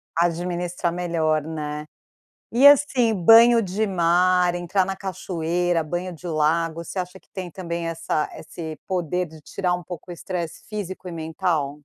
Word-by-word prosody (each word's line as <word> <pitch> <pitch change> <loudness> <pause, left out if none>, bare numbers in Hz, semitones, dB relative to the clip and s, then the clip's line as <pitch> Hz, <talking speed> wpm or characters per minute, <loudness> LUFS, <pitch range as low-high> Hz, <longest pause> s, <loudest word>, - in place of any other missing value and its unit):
Administrar 175 +1 -1
melhor, 165 -3 0
né? 150 -1 -5 0.7
E, 260 +5 +7
assim, 260 -5 +5
banho 230 +5 +7
de 200 +3 -1
mar, 180 0 +3
entrar 175 +2 0
na 195 0 -3
cachoeira, 175 -2 -1
banho 175 +3 -4
de 175 +2 -9
lago, 165 +1 0
você 185 - -5
acha 180 +1 -5
que - - -35
tem 185 -3 -6
também 170 -1 -4
essa 165 -2 -2
esse 160 -3 -7
poder 180 -1 -1
de 160 -2 -14
tirar 180 +3 -2
um 180 0 -3
pouco 175 +1 -8
o - - -4
estresse 170 -1 -5
físico 190 -3 -6
e - - -5
mental? 160 -2 -1
175 Hz, 155 wpm, -23 LUFS, 165-185 Hz, 0.7 s, E